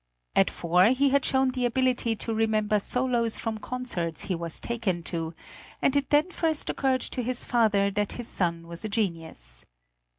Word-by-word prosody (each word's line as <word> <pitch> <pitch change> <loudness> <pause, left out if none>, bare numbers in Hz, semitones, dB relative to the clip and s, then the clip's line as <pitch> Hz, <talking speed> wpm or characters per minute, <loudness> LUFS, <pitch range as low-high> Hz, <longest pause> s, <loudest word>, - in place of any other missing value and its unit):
At - - +5
four 180 +3 +3
he 265 +4 +3
had 275 0 +3
shown 265 0 +2
the 255 -1 -1
ability 245 -2 +1
to 225 +1 -3
remember 215 -1 +2
solos 240 0 0
from 225 -1 -3
concerts 210 -10 -3
he 190 - -2
was 165 -1 -3
taken 215 -8 -2
to, 165 -1 -4 0.4
and 275 - +2
it 280 -1 +1
then 300 +5 +3
first 320 -3 0
occurred 265 -1 +1
to 250 - -3
his 245 +1 -1
father 205 -4 +3
that 205 0 -1
his 240 -2 -6
son 170 -2 -1
was 170 +3 -7
a 215 - -3
genius. 165 - -2
225 Hz, 175 wpm, -27 LUFS, 180-255 Hz, 0.4 s, At